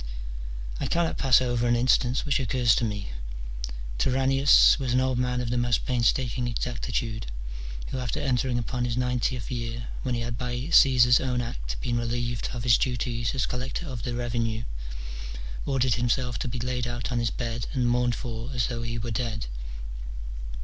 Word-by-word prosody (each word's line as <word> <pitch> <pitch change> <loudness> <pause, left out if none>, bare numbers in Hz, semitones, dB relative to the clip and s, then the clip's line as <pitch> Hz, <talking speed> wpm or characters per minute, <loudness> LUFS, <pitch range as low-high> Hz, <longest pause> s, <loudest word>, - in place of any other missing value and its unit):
I - - -1
cannot 170 -1 +1
pass 130 -1 +6
over 120 -1 +1
an 120 - +4
an - - +1
instance 125 0 +3
which 145 -2 +2
occurs 125 -2 +3
to - - +1
me: 105 - -2 0.9
Turannius 135 - +5
was 130 -3 -1
an 130 - +4
old 130 -1 +1
man 125 0 +1
of 120 -1 -2
the 120 - +1
most 120 -1 +1
painstaking 125 0 +1
exactitude, 120 -2 -2 0.6
who 130 - -3
after 125 +4 -2
entering 130 -3 +1
upon 120 +1 -2
his 120 -1 -1
ninetieth 125 -1 0
year, 120 -1 -4
when 125 -2 -1
he 120 - -1
had 115 0 -3
by 125 -1 -2
Gr. 140 +7 -5
Caesar's 125 -5 +7
own 125 -1 0
act - - -4
been 120 0 0
relieved 120 0 -2
of 120 -2 -4
his 120 -2 +5
duties 120 -1 -1
as 130 - +2
collector 130 +7 -3
of 130 -4 -5
the 120 0 -3
revenue, 115 -2 -1 1.0
ordered 130 -3 +2
himself 120 -1 0
to - - -2
be 125 +1 -3
laid 125 0 -1
out 120 0 -3
on 120 - +1
his 115 -1 +1
bed 115 -1 -3
and 125 -2 +1
mourned 120 0 +2
for 115 0 -5
as 120 - +2
though 120 -2 -3
he 115 0 -3
were 115 0 -3
dead. 110 -1 -2
120 Hz, 185 wpm, -27 LUFS, 115-125 Hz, 1.0 s, Caesar's